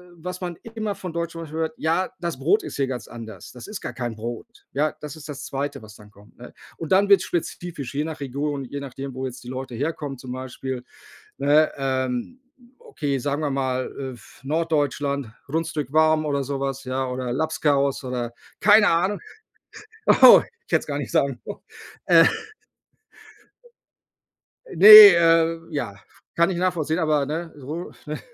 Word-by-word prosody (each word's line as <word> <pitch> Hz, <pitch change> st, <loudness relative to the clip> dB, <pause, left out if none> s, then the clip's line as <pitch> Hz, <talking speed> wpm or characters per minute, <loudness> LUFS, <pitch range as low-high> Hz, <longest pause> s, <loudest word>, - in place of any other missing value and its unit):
was 180 Hz, +2 st, -7 dB
man 175 Hz, -1 st, -4 dB, 0.2 s
immer 215 Hz, -3 st, -3 dB
von 180 Hz, -3 st, -7 dB
Deutschen 170 Hz, 0 st, -3 dB
zum 165 Hz, -, -7 dB
Beispiel 160 Hz, +1 st, -7 dB
hört: 160 Hz, 0 st, -1 dB
„Ja, 165 Hz, +4 st, 0 dB
das 170 Hz, -1 st, -4 dB
Brot 415 Hz, 0 st, +2 dB
ist 345 Hz, -, -7 dB
hier 135 Hz, -1 st, 0 dB
ganz 125 Hz, -3 st, -5 dB
anders. 110 Hz, -5 st, -10 dB
Das 125 Hz, -, -11 dB
ist 210 Hz, -1 st, -7 dB
gar -, -, -6 dB
kein 120 Hz, -3 st, -4 dB
Brot“, 115 Hz, +2 st, -8 dB
ja? 150 Hz, +2 st, 0 dB
Das 150 Hz, -2 st, -8 dB
ist 155 Hz, -1 st, -11 dB
das 145 Hz, -, -7 dB
2., 140 Hz, -3 st, -4 dB
was 110 Hz, 0 st, -13 dB
dann 105 Hz, 0 st, -16 dB
kommt, 105 Hz, +1 st, -21 dB
ne? 125 Hz, -, -12 dB, 0.2 s
Und 160 Hz, -, -7 dB
dann 195 Hz, +2 st, +4 dB
wird's 200 Hz, -1 st, +5 dB
spezifisch, 165 Hz, -5 st, -4 dB
je 145 Hz, -, -1 dB
nach 160 Hz, -1 st, -6 dB
Region, 140 Hz, +1 st, -3 dB
je 140 Hz, +3 st, -6 dB
nachdem, 135 Hz, 0 st, -7 dB
wo 130 Hz, +1 st, -4 dB
jetzt 125 Hz, 0 st, -10 dB
die -, -, -12 dB
Leute 130 Hz, -1 st, -6 dB
herkommen 145 Hz, +1 st, -4 dB
zum 125 Hz, 0 st, -9 dB
Beispiel, 130 Hz, 0 st, -6 dB, 0.5 s
ne? 145 Hz, +3 st, +3 dB
Ähm, 130 Hz, -, -2 dB, 0.4 s
okay, 140 Hz, -4 st, -3 dB
sagen 145 Hz, +4 st, -2 dB
wir 150 Hz, -2 st, -1 dB
mal, 130 Hz, -1 st, -2 dB
äh, 135 Hz, -1 st, -5 dB
f 120 Hz, -2 st, -17 dB
Norddeutschland, 145 Hz, -3 st, -1 dB, 0.2 s
Rundstück 150 Hz, -2 st, -3 dB
warm 155 Hz, 0 st, +3 dB
oder 140 Hz, -2 st, -1 dB
so 140 Hz, 0 st, -4 dB
was, 135 Hz, 0 st, -3 dB
ja 130 Hz, 0 st, -2 dB
oder 125 Hz, -1 st, -4 dB
Labskaus 140 Hz, -1 st, 0 dB
oder 125 Hz, -2 st, -4 dB, 0.3 s
keine 210 Hz, 0 st, +6 dB
Ahnung. 185 Hz, +5 st, 0 dB, 1.0 s
Oh, -, -, +10 dB, 0.2 s
ich -, -, -20 dB
hätte -, -, +5 dB
es -, -, -12 dB
gar -, -, -3 dB
nicht -, -, -5 dB
sagen -, -, +1 dB
sollen, -, -, -7 dB, 0.5 s
äh. -, -, +7 dB, 2.5 s
Ne, 205 Hz, -, +6 dB, 0.3 s
äh, 165 Hz, 0 st, +3 dB
ja, 140 Hz, -10 st, -4 dB, 0.4 s
kann 170 Hz, +2 st, +3 dB
ich 175 Hz, -, -3 dB
nachvollziehen, 170 Hz, -3 st, 0 dB
aber, 155 Hz, -3 st, +1 dB
ne, 165 Hz, +3 st, -4 dB
Run 155 Hz, +7 st, -6 dB
ne, 150 Hz, -, -4 dB
145 Hz, 180 wpm, -23 LUFS, 130-165 Hz, 2.5 s, Oh